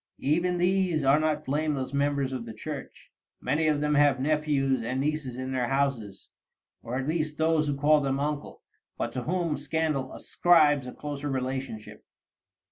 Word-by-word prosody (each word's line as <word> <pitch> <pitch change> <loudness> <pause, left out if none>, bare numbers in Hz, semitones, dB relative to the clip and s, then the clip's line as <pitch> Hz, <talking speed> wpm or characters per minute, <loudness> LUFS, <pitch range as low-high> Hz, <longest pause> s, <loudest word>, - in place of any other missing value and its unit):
Even 175 +5 +1
these 180 -3 +1
are 135 +2 +5
not 155 -1 0
blameless 140 -2 -1
members 140 -1 0
of 120 -3 -5
the 110 - -8
Church. - - -8 0.3
Many 150 +5 0
of 150 -1 +1
them 150 0 +1
have 145 -3 +4
nephews 140 -3 +1
and 125 +3 -2
nieces 145 -3 -2
in 130 0 -4
their 125 -2 0
houses, 135 -7 -2 0.5
or 120 +2 -4
at 135 +1 -3
least 155 -1 -1
those 160 -1 +2
who 145 -1 -1
call 150 +1 +4
them 135 -1 -1
uncle, 145 0 -4 0.3
but - - -3
to 125 - -4
whom 170 -3 -1
scandal 145 -2 -1
ascribes 150 -6 +3
a - - -5
closer 145 0 -5
relationship. 130 -4 -4
145 Hz, 165 wpm, -27 LUFS, 130-155 Hz, 0.5 s, are